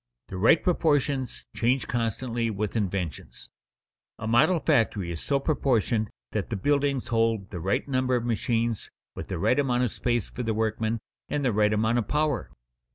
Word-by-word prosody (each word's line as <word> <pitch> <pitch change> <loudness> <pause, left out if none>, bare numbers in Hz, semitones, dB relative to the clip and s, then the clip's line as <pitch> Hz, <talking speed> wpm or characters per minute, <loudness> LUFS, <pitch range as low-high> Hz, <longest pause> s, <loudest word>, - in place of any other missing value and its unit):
The 95 - -5
right 115 - +5
proportions 145 -6 +1
change 120 0 +1
constantly 115 0 -1
with 105 0 -3
inventions. 90 - -3 0.7
A 115 - -6
model 135 +11 +4
factory 115 - +1
is 80 - -5
so 140 -1 +1
proportioned 120 -7 +1 0.2
that 105 -3 -2
the 115 - -2
buildings 140 +4 0
hold 115 -4 +1
the 90 - -5
right 95 - -1
number 130 -1 +1
of 120 -1 -1
machines, 115 -1 -1 0.3
with - - -6
the - - -3
right 125 - +2
amount 125 -3 +2
of 120 - -1
space 120 -4 0
for 125 - -6
the 110 -2 -1
workmen, 110 0 -1 0.3
and 145 -2 -1
the 125 - +2
right 105 0 +3
amount 110 +3 +2
of 110 - -3
power. 150 -4 0
115 Hz, 170 wpm, -27 LUFS, 105-130 Hz, 0.7 s, right